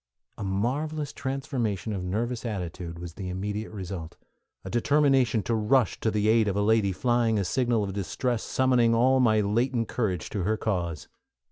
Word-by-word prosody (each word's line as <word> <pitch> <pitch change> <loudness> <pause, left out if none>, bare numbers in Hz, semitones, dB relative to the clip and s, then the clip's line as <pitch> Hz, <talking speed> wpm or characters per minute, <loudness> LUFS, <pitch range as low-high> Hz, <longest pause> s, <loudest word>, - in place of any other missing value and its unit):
A - - -3
marvelous 140 +10 -2
transformation 130 -6 -2
of 95 -2 -3
nervous 115 +6 -2
attitude 90 -6 -5
was 85 -1 -7
the 95 +1 -6
immediate 105 +4 -4
result, 95 -5 -6 0.5
a - - -5
determination 135 -3 +3
to 115 - -1
rush 115 +1 +2
to 110 - +1
the 105 -1 0
aid 110 -1 +4
of 100 - 0
a 105 - +1
lady 110 -2 +3
flying 120 +2 +1
a 100 - 0
signal 120 +2 +1
of 95 -1 -4
distress 110 +5 -2
summoning 125 -3 +2
all 130 +3 +4
my 110 -4 +4
latent 115 +3 0
courage 95 -9 -2
to 100 - -2
her 110 +5 0
cause. 85 -8 -2
110 Hz, 170 wpm, -27 LUFS, 100-125 Hz, 0.5 s, aid